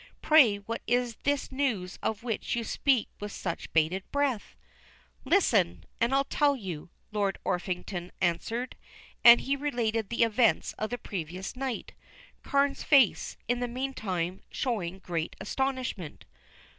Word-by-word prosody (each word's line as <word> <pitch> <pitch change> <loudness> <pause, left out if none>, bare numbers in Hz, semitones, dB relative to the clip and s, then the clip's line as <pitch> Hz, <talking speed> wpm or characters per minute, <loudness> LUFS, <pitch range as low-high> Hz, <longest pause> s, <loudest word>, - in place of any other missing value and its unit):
Pray 270 -10 +6
what 225 +3 -5
is 245 0 +1
this 285 -1 0
news 240 -10 -1
of 220 +1 -2
which 230 -2 -2
you 235 - -1
speak 260 +1 +1
with 205 0 -5
such 170 -4 -5
bated 165 +4 +2
breath?" 280 -6 -1 0.7
"Listen, 215 - +3 0.2
and 235 +2 +2
I'll 275 +1 +3
tell 285 +1 +2
you," 180 - -6 0.2
Lord 200 -2 0
Orpington 180 0 -3
answered, 210 +8 -1 0.5
and 235 0 +10
he 275 - 0
related 235 -7 -1
the 235 0 +2
events 230 0 +2
of 215 - -1
the 245 - -3
previous 185 -2 -5
night, 260 -2 -4 0.5
Carne's 280 0 +1
face, 270 -8 +4
in 245 +1 +1
the 245 - -1
meantime, 210 -9 -3
showing 195 -8 -2
great 170 -4 -3
astonishment. 255 - -3
225 Hz, 135 wpm, -29 LUFS, 185-260 Hz, 0.7 s, and